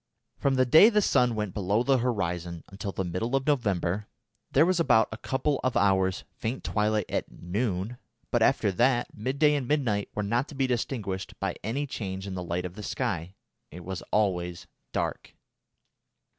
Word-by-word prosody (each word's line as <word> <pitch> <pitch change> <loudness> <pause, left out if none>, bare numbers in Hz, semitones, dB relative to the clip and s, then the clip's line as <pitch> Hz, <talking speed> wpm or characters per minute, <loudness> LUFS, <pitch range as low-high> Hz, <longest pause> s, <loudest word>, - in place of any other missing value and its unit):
From 135 -1 +2
the 130 0 +4
day 160 - +8
the 210 -2 +3
sun 125 - +3
went 105 -4 -2
below 105 +3 +1
the 135 0 +3
horizon 90 -8 -2
until 100 +1 -5
the 95 - -2
middle 90 +9 -1
of 135 -1 0
November 105 - 0 0.4
there 150 +4 +5
was 180 0 +2
about 110 -9 +4
a 110 - -5
couple 135 +3 -1
of 130 -1 +1
hours 95 -1 +2
faint 115 +4 -4
twilight 105 -1 +1
at - - -2
"noon," 100 +4 -3 0.3
but, - - +2
after 100 - +3
that, 120 +4 +1
midday 140 +7 +2
and 140 -4 -1
midnight 120 -9 0
were 105 - -1
not 120 +7 0
to 145 - -10
be 135 0 +1
distinguished 115 -6 -3
by - - -2
any 130 +7 -1
change 95 -7 -5
in 100 - -5
the 90 - -4
light 90 +1 -2
of 90 - -5
the 105 - -8
sky. 90 -2 -3 0.3
It 85 +1 -10
was 95 0 -4
always 90 -5 0 0.3
dark. - - -3
105 Hz, 180 wpm, -28 LUFS, 95-130 Hz, 0.4 s, day